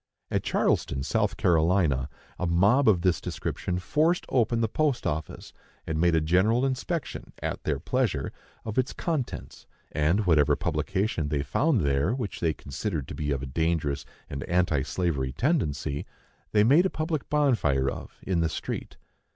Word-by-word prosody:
At - - +1
Charleston, 65 -1 0
South 105 +5 0
Carolina, 80 -6 +2 0.3
a 90 - 0
mob 100 +10 +4
of 90 -5 +3
this 90 -3 +2
description 90 - -3
forced 155 - +1
open 120 -2 +2
the 115 - +2
post 145 +2 0
office, 80 +1 -4 0.3
and 80 0 -1
made 85 -1 +4
a 80 - +3
general 95 - +3
inspection, 135 +4 -3
at - - -3
their 75 -3 +1
pleasure, 110 - -1 0.3
of 110 +2 -1
its 130 +2 0
contents; 155 -8 -4 0.2
and 80 +8 +1
whatever 75 -5 +4
publication 85 +1 -1
they 70 -2 0
found 130 - +2
there 70 - +1
which 120 -7 -4
they 80 - +2
considered 75 - -4
to - - -5
be 75 -1 -3
of 70 -2 -1
a - - -2
dangerous 75 0 -1 0.2
and 70 -1 -5
anti 85 -5 +2
slavery 70 -5 -1
tendency, 75 - -1 0.4
they 105 -1 +4
made 150 - +5
a - - -4
public 155 -3 -3
bonfire 110 - +2
of, - - -5
in 95 -3 0
the 80 -1 +2
street. - - -5
90 Hz, 160 wpm, -27 LUFS, 75-120 Hz, 0.4 s, made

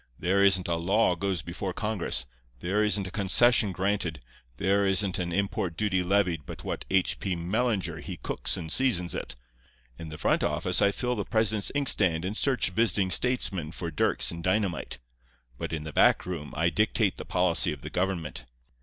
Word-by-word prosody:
There 100 +3 +2
isn't 95 -2 +3
a 85 -1 0
law 95 +4 +2
goes 95 0 -2
before 90 +2 -4
Congress, 100 - -1 0.3
there 95 +7 0
isn't 105 -2 0
a 95 - -6
concession 105 +2 +4
granted, 95 -4 -1 0.4
there 100 +4 +2
isn't 95 -1 +1
an 85 -1 -2
import 90 -2 -1
duty 100 -2 +1
levied 90 -5 +1
but - - -8
what - - -4
H. 95 -1 +1
P. 95 -3 -2
Mellinger 100 +4 -1
he - - -7
cooks - - -2
and 80 -3 -6
seasons 90 - +2
it. - - -5 0.6
In 80 - -7
the 75 - -8
front - - +1
office - - 0
I 100 - +5
fill 125 +4 -2
the - - -2
president's 110 -2 +1
inkstand 95 - +2
and 100 +3 -3
search 130 -5 +1
visiting 95 -2 +2
statesmen 95 -7 0
for 85 0 -5
dirks 75 - +1
and 85 0 -7
dynamite; 95 -5 -1 0.6
but - - -4
in 80 -2 -3
the 75 -1 -7
back - - +4
room 80 -5 -5
I 85 +2 +2
dictate 105 -1 +1
the - - -6
policy 90 -2 +1
of 75 -4 -7
the - - -8
government. 90 -3 -2
95 Hz, 180 wpm, -28 LUFS, 85-105 Hz, 0.6 s, I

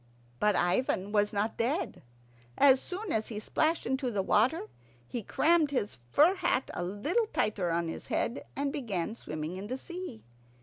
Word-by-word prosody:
But 210 -2 +3
Ivan 185 +2 +1
was 205 -1 +2
not 210 +1 -1
dead. 265 +10 -1 0.6
As 265 -2 +6
soon 380 +1 -5
as 220 0 0
he 215 -3 -5
splashed 310 +9 0
into 265 0 0
the 205 -4 -1
water, 215 - +2 0.4
he 240 - -3
crammed 315 - +3
his 230 - -2
fur 310 - +6
hat 315 -8 0
a 175 - -3
little 290 - 0
tighter 205 - 0
on 170 0 0
his 165 - -6
head, 235 - -1
and 280 +1 -1
began 220 - -2
swimming 155 -3 -5
in 195 +2 -6
the 255 +4 -3
sea. 345 -7 -7
230 Hz, 170 wpm, -30 LUFS, 205-290 Hz, 0.6 s, As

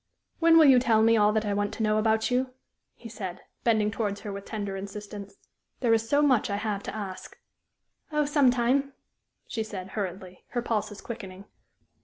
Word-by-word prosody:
"When 330 0 +6
will 320 - +8
you 265 -3 +7
tell 225 -3 +3
me 230 +1 +5
all 210 -1 +4
that 215 0 0
I 205 - 0
want 205 0 -1
to 225 - -2
know 215 0 +2
about 220 +2 +1
you?" 255 +1 0 0.4
he 235 - -11
said, 190 -5 -6 0.2
bending 215 -3 +2
towards 205 -1 -3
her 205 - -6
with 200 0 -7
tender 205 -3 -4
insistence. 200 +1 -8 0.4
"There 235 -3 +3
is 225 0 0
so 290 +1 +3
much 260 -7 +3
I 200 - -1
have 205 -1 -2
to - - -6
ask." 195 -3 -7 0.7
"Oh, 300 -1 +1
some 285 -3 +4
time," 255 +3 +1 0.5
she 225 - -4
said, 195 -4 -6
hurriedly, 185 -2 -6
her 240 - 0
pulses 210 -3 -2
quickening. 200 -5 -8
215 Hz, 190 wpm, -27 LUFS, 200-240 Hz, 0.7 s, will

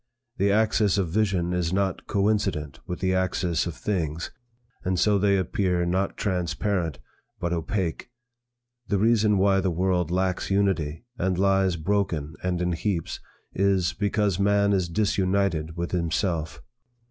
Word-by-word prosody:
The 100 +1 +2
axis 105 -1 +2
of 95 -4 0
vision 95 -2 0
is 90 -2 0
not 95 -1 -1
coincident 100 -8 0
with 90 - -5
the 95 0 +1
axis 90 -3 0
of 85 - -5
things, 85 -5 -2 0.5
and 90 -1 0
so 105 +1 +3
they 100 0 +3
appear 90 -1 0
not 95 +3 -1
transparent 90 -2 -1 0.4
but 85 - -2
opake. 85 +3 -2 0.8
The 100 - +1
reason 105 -1 +3
why 95 0 +3
the 95 0 0
world 90 -1 0
lacks 90 +1 -1
unity, 95 -3 0
and 95 0 0
lies 95 -1 +2
broken 85 -3 -1
and 90 -1 -1
in 90 - 0
heaps, 85 0 -2 0.3
is, 95 -2 +2
because 100 -2 0
man 100 0 +3
is 90 -3 0
disunited 95 -4 0
with 85 0 -3
himself. 85 -2 -1
95 Hz, 140 wpm, -25 LUFS, 85-100 Hz, 0.8 s, so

